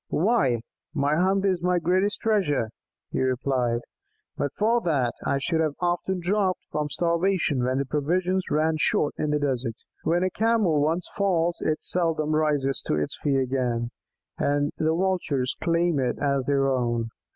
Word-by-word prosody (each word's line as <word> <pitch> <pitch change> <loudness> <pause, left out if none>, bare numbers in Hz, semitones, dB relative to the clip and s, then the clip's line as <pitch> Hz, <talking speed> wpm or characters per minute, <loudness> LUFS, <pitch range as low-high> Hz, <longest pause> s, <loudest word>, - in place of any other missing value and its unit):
"Why, 165 - +2 0.3
my 145 0 +2
hump 190 +3 +2
is 185 -3 +1
my 180 0 +2
greatest 185 +4 +1
treasure," 180 - +1 0.4
he - - -1
replied. 130 -2 0 0.5
"But 145 - -2
for 230 +3 +2
that, 135 - +1
I 140 - +2
should 160 +4 0
have 155 -2 0
often 180 +1 -1
dropped 185 0 0
from 150 -1 -1
starvation 170 -4 +1
when 130 +2 0
provisions 180 +7 0
ran 155 +1 +1
short 150 - +2
in 150 - 0
the 150 - +2
desert. 130 -5 -1 0.3
When 175 +3 +1
a 185 - 0
Camel 215 -9 +2
once 165 +4 0
falls 175 -4 +1
it 155 - -1
seldom 160 -3 +1
rises 145 -3 +1
to - - +1
its 75 -1 -2
feet 140 -2 +1
again, 125 -2 -1 0.5
and 145 +1 +1
the 160 +1 +1
Vultures 170 -8 0
claim 170 -2 +2
it 125 -2 0
as 140 -2 0
their 140 -1 +2
own. 120 -3 0
155 Hz, 160 wpm, -25 LUFS, 135-180 Hz, 0.5 s, Why